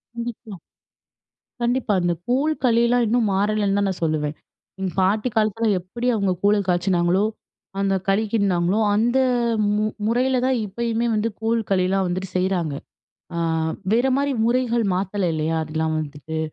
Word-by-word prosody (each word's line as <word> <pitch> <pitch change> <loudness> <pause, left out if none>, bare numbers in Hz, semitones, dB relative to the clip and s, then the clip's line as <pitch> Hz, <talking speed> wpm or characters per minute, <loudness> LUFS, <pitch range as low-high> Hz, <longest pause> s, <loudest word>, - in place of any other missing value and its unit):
கண்டிப்பா. 235 -2 -6 1.1
கண்டிப்பா. 240 -2 +1
அந்த 175 0 +1
கூழ், 275 +6 +2
களில்லாம் 235 0 +3
இன்னும் 225 -1 +2
மாறலன்னு 205 0 +1
தான் 200 - +1
நான் 185 - -5
சொல்லுவேன். 155 -1 -1 0.4
எங்க 190 -1 -2
பாட்டி 210 +6 +1
காலத்தில 220 +1 +1
எப்பிடி 235 +8 -5
அவுங்க 200 -4 +1
கூழ 205 +1 +5
காய்ச்சினாங்களோ, 180 +2 +2 0.5
அந்த 195 0 +1
களிக்கிண்ட்னாங்களோ, 200 -2 +1 0.2
அந்த 235 +4 +2 0.6
மு 215 +1 +1 0.2
முறையில 250 +3 +2
தான் 260 -1 +2
இப்பயுமே 230 +3 -1
வந்து 215 +2 0
கூழ், 225 +1 +1
களில்லாம் 190 0 +2
வந்துட்டு 185 +1 -3
செய்றாங்க. 180 -5 0 0.6
ஆ - - -1 0.5
வேறமாரி 265 +4 +2
முறைகள் 240 -1 +1
மாத்தல 190 0 -1
இல்லையா, 160 +1 -1
அதுக்கெல்லாம் 160 0 -2
வந்துட்டு. 150 +1 -6
205 Hz, 130 wpm, -22 LUFS, 180-235 Hz, 1.1 s, கூழ